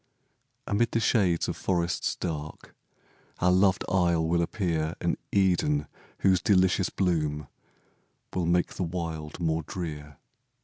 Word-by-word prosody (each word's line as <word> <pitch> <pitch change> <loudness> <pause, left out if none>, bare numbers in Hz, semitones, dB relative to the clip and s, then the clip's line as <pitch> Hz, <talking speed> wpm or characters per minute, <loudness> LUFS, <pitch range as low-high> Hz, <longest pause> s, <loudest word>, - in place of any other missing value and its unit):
Amid 115 +3 +1
the 115 - +2
shades 95 -6 +2
of - - -2
forests 85 -2 -1
dark, 75 -3 -6 0.6
Our 90 - +3
loved 95 +1 +3
isle 85 -3 +2
will 85 +1 +2
appear 85 -3 -1
An - - 0 0.2
Eden, 90 -7 +2 0.4
whose 95 -2 +4
delicious 95 -1 +3
bloom 75 -6 -1 0.9
Will 90 -3 -1
make 90 +1 +1
the 95 - -3
wild 80 -3 -4
more 80 -1 0
drear. 75 -4 -6
85 Hz, 125 wpm, -27 LUFS, 80-95 Hz, 0.9 s, whose